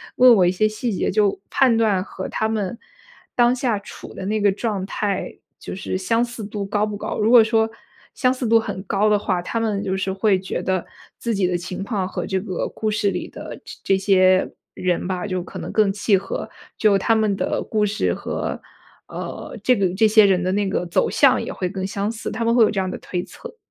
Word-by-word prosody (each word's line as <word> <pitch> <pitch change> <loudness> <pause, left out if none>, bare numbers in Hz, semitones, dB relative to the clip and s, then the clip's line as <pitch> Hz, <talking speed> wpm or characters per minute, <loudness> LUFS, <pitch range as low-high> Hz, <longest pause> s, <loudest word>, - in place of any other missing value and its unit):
问 250 -1 +8
我 190 - +4
一 175 - +3
些 215 +4 +2
细 215 +3 -3
节， 195 - -1
就 205 0 +2
判 255 -4 +4
断 210 -5 +2
和 190 -1 -7
他 220 - -1
们 220 +1 -2 0.6
当 240 0 +4
下 245 -4 0
处 200 - -11
的 190 - -6
那 215 +2 -1
个 205 -1 +4
状 205 -1 -2
态， 200 -2 -3 0.2
就 - - -7
是 185 0 -3
相 230 +5 +1
似 230 -2 -8
度 205 0 -4
高 205 +1 0
不 210 -1 -5
高。 - - -4
如 215 +1 +2
果 235 -2 +8
说 220 0 +2 0.5
相 255 -2 +2
似 255 -2 -3
度 230 +1 +5
很 205 -4 -5
高 200 +2 +1
的 210 -1 +4
话， 190 -3 -1
他 230 - -2
们 215 -3 -1
就 190 - -1
是 190 0 -2
会 195 0 +2
觉 190 - -4
得 185 -1 -1 0.3
自 235 - -1
己 195 -2 +1
的 180 - -1
情 180 +2 -6
况 200 -3 -2
和 - - -4
这 190 -1 -1
个 185 -3 -3
故 220 - -1
事 210 -1 +1
里 - - -4
的 - - -8
这 - - -10
这 195 - +3
些 185 -1 +3 0.2
人 180 -1 -1
吧， 180 -1 -2
就 185 -3 -2
可 175 - -9
能 - - -6
更 210 -3 +2
契 205 -1 +2
合， 195 - -5 0.3
就 210 -2 +4
他 225 +4 +2
们 215 -2 +1
的 - - -1
故 215 -1 0
事 210 +1 0
和， - - -4 0.5
呃， - - -7
这 250 - +4
个 195 -4 +1
这 220 +3 +4
些 215 0 +6
人 185 -2 +2
的 185 - 0
那 200 +1 0
个 180 - -1
走 170 - +1
向 - - +4
也 - - -5
会 185 - -3
更 190 0 -4
相 200 +2 -2
似， 225 -1 -5
他 230 +1 -3
们 230 - +3
会 240 - +6
有 215 - +4
这 205 - -1
样 190 -1 -1
的 - - -4
推 180 -1 -4
测。 485 -1 -11
205 Hz, 255 characters per minute, -22 LUFS, 190-220 Hz, 0.6 s, 问